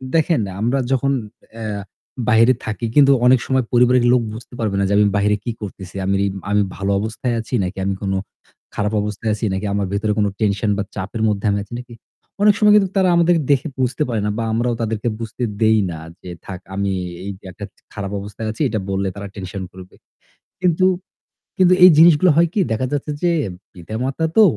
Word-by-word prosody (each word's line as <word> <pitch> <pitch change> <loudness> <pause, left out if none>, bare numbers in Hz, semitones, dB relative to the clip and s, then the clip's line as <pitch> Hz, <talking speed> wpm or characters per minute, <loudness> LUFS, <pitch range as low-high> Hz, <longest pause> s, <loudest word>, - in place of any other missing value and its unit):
দেখেন 160 -5 +2 0.2
আমরা 125 +4 +1
যখন 135 +1 +2 0.4
অ্যা 105 -3 -4 0.5
বাইরে 115 +2 +5
থাকি 110 +2 -3
কিন্তু 140 -1 +6
অনেক 125 0 +6
সময় 130 -2 +1
পরিবারের 125 0 +4
লোক 125 - +4
বুঝতে 120 +2 -11
পারবে 105 -3 -1
না - - +2
যে - - +1
আমি 105 - +5
বাইরে 105 +1 +2
কি 120 - -2
করতেছি। 95 -2 -8
আমি, 100 +1 +1 0.3
আমি 105 0 +3
ভালো 100 +1 -2
অবস্থায় 115 +3 -2
আছি 115 - -8
নাকি 90 +1 -4
আমি 100 - 0
কোন 100 -1 -2 0.6
খারাপ 105 +1 -1
অবস্থায় 105 +1 -3
আছি 105 +1 -3
নাকি 95 +2 -3
আমার 100 -1 0
ভেতরে 105 +1 0
কোন 105 - +3
টেনশন 105 0 +1
বা 105 - -1
চাপের 100 +4 -4
মধ্যে 105 0 -1
আমি 100 - 0
আছি 105 - -13
নাকি? 125 -1 -11 0.5
অনেক 210 0 +6
সময় 210 -1 +6
কিন্তু 195 -3 +4
তারা 185 -1 +4
আমাদেরকে 170 -1 +3
দেখে 140 +2 +2
বুঝতে 130 +3 0
পারে 110 -3 -1
না 105 - 0
বা 115 - -1
আমরাও 120 +1 0
তাদেরকে 110 +1 -2
বুঝতে 115 +2 -5 0.2
দেই 110 0 +4
না 80 - -7 0.2
যে 90 - -9 0.2
থাক 95 -3 -7 0.2
আমি 100 0 -1 0.3
এই 100 - -3
যে - - -20
একটা 100 +3 -8 0.3
খারাপ 100 -2 -5
অবস্থায় 105 +2 -6
আছি। 110 - -8
এটা 110 - -1
বললে 95 0 -1
তারা 100 0 -6
টেনশন 95 0 -6
করবে। 95 0 -13 0.7
কিন্তু, 180 +1 +3 0.7
কিন্তু 185 -1 +5
এই 185 - +11
জিনিসগুলো 165 +1 +6
হয় 170 +1 +5
কি 210 - 0
দেখা 110 +4 0
যাচ্ছে 145 +1 -2
যে 175 - +3 0.4
পিতা-মাতা 120 - -3
তো 220 - +9
110 Hz, 200 wpm, -20 LUFS, 100-130 Hz, 0.7 s, এই